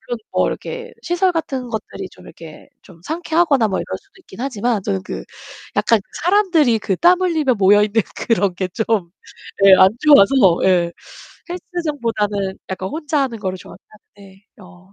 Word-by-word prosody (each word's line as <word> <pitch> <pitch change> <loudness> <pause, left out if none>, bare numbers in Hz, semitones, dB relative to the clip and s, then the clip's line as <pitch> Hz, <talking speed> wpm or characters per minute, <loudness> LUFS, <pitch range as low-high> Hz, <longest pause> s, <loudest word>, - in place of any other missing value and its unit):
그런 240 +1 -5
뭐 - - +2
이렇게 475 0 -6
시설 355 +1 +1
같은 275 -7 -3
것들이 210 -4 -6
좀 - - -17
이렇게 160 -1 -13
좀 170 -3 -17
상쾌하거나 320 -6 +1
뭐 190 - -2
이럴 - - -6
수도 - - -31
있긴 340 - -13
하지만 240 -4 -1
저는 95 - -2
그 - - -6 0.5
약간 230 -2 +3 0.2
사람들이 345 - +3
그 195 -3 -1
땀 360 - +4
흘리며 315 -8 +1
모여 205 0 +4
있는 215 +1 +1
그런 200 -5 0
게 185 +1 -3
좀 210 -2 -1 0.5
예, 195 -1 +9
안 185 - +7
좋아서 280 -6 +6 0.3
예, 175 -2 +2 0.6
헬스장보다는 235 - -3
약간 190 0 -4
혼자 300 -2 -2
하는 245 -4 -3
거를 190 -2 -3
좋아는 180 - -13 0.4
하는데. 195 0 -17 0.2
어. 185 +1 -18
225 Hz, 330 characters per minute, -19 LUFS, 190-310 Hz, 0.6 s, 예